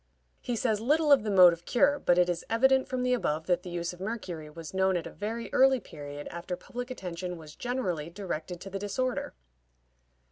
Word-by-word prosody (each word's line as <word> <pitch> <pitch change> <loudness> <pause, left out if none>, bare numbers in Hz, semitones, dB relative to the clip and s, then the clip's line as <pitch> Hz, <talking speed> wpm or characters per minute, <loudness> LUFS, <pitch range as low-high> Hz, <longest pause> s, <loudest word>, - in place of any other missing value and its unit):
He 245 - -3
says 220 -2 0
little 300 +5 +3
of 280 - +7
the 215 - -3
mode 180 -3 +8
of 170 0 -9
cure, 280 +3 +3
but 175 - +3
it 180 0 +5
is 175 -1 -2
evident 265 +3 +3
from 255 -1 -2
the 250 0 +2
above 160 -10 -1
that 180 0 +1
the 180 - -8
use 175 0 -3
of 180 - -13
mercury 185 -7 -5
was 165 +1 -9
known 190 -1 +2
at 170 - -4
a - - -7
very 225 +3 -5
early 265 0 +5
period 145 -6 -8
after 170 +1 -4
public 245 +1 -7
attention 180 -6 -5
was 155 -2 -12
generally 185 - -2
directed 175 -2 -5
to 195 - -8
the 195 - -3
disorder. 245 - -2
190 Hz, 210 wpm, -29 LUFS, 170-245 Hz, -, mode